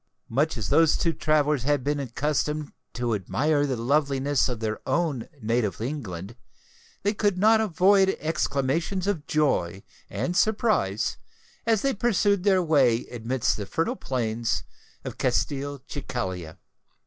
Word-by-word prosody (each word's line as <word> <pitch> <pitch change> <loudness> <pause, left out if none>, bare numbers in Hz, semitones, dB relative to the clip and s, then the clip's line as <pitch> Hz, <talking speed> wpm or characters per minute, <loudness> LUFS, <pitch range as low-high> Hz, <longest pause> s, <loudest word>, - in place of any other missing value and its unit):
Much 145 +5 +1
as 105 -5 -3
those 165 -1 +4
two 165 - +1
travellers 150 -3 +1
had 145 +1 +1
been 145 +1 0
accustomed 150 +3 -2 0.2
to 120 -1 -2
admire 145 - +1
the 130 - -1
loveliness 140 +2 +1
of 120 -3 -3
their 110 -1 -2
own 160 -8 0
native 115 -2 0
England, 110 - -5 0.7
they 205 +2 +2
could 205 -3 +1
not 220 +3 +5
avoid 195 0 +3
exclamations 160 +4 -1
of 195 -7 -2
joy 100 - 0 0.3
and 130 - -2
surprise 205 - +1 0.5
as 225 -3 +2
they 275 -1 +2
pursued 200 -3 +1
their 190 -2 +3
way 135 -8 +3
amidst 120 +1 -1
the 100 -2 -5
fertile 165 - -1
plains 115 - -2 0.4
of - - -6
Castelcicala. 130 - -3
145 Hz, 130 wpm, -26 LUFS, 120-175 Hz, 0.7 s, not